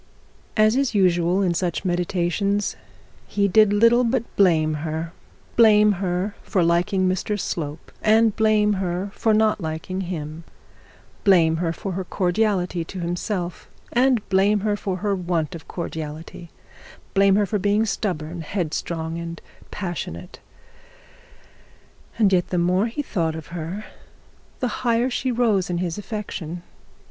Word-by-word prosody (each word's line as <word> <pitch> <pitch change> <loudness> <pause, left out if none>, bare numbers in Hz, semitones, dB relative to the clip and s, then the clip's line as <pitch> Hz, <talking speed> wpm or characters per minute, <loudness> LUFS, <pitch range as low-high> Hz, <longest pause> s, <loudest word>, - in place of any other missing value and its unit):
As 215 +1 +5
is 270 -4 0
usual 180 0 +3
in 180 -2 +2
such 175 +1 -2
meditations, 180 +3 0 0.5
he 200 -1 +1
did 210 +2 +5
little 230 +4 +5
but 240 0 +1
blame 160 -5 +3
her; 160 +1 -4 0.4
blame 210 -2 +6
her 185 +2 -1
for 185 - 0
liking 175 +3 +2
Mr 190 +3 -1
Slope, 155 -4 -4
and 220 0 +4
blame 215 -1 +3
her 185 +2 -2
for 225 - +1
not 215 -1 +3
liking 165 +4 -4
him; 165 -3 -5 0.8
blame 165 -5 +4
her 165 0 0
for 195 +4 -5
her 190 +1 -3
cordiality 180 -1 0
to 185 +3 -8
himself, 175 +1 -3 0.2
and 250 -2 +2
blame 200 +2 +3
her 210 0 +1
for 195 -2 -3
her 205 - +2
want 175 -2 -1
of 165 - -9
cordiality; 160 0 -6 0.6
blame 195 0 +5
her 205 0 +3
for 205 +2 -1
being 205 +3 +2
stubborn, 175 -6 -3
headstrong, 165 -1 -3
and 170 0 -6 0.3
passionate; 175 - -6 1.8
and 205 -4 +3
yet 180 -1 +2
the 180 - -2
more 180 +5 +2
he 265 +6 -4
thought 165 - -1
of 160 -1 -8
her 175 +5 -5 0.8
the 250 - +1
higher 240 +1 +2
she 255 +1 -1
rose 225 -7 +1
in 175 - -1
his 175 +1 -2
affection. 195 -5 -6
185 Hz, 140 wpm, -23 LUFS, 170-210 Hz, 1.8 s, blame